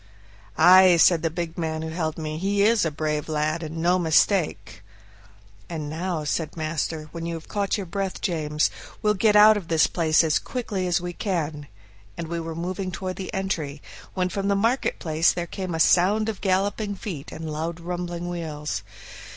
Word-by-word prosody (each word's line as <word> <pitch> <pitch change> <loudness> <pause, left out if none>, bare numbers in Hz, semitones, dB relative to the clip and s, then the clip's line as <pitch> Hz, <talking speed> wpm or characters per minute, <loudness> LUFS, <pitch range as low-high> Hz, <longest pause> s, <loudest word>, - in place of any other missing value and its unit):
"Ay," 185 -1 +7
said 165 0 +5
the 165 - 0
big 170 +1 -5
man 160 -1 -2
who 160 - -4
held 160 -1 -3
me; 155 -1 -4
"he 200 +2 +1
is 225 +1 +4
a - - +1
brave 150 0 -2
lad, 155 +2 0
and 160 0 -6
no 175 +3 +2
mistake." 160 - +1 0.9
"And 155 -3 -5
now," 170 0 -2
said 155 +2 -2
master, 155 0 -3
"when 165 0 -5
you 170 - -3
have 165 - -9
got 205 -1 -1
your 200 - -4
breath, 195 +2 -3
James, 155 -4 0 0.3
we'll 210 0 +4
get 210 +1 +3
out 210 +1 +8
of 190 -5 -6
this 160 -1 +4
place 160 -1 +2
as 155 -2 +2
quickly 205 -7 -3
as 175 - +2
we 175 0 -5
can," 160 -7 -3 0.5
and 165 -1 -5
we 170 0 -2
were 165 0 -5
moving 185 +3 -3
toward 185 -1 -5
the 190 - -5
entry, 170 -8 -3 0.4
when 185 -1 0
from 195 +2 -2
the 200 - +2
market 230 +6 +1
place 160 +1 +2
there 175 - -3
came 180 0 -5
a - - -3
sound 200 +7 +4
of 215 - -5
galloping 200 +2 0
feet 170 -7 -7
and 160 -1 -6
loud 165 +2 -3
rumbling 175 0 -4
wheels. 160 -4 -4
170 Hz, 190 wpm, -24 LUFS, 160-190 Hz, 0.9 s, out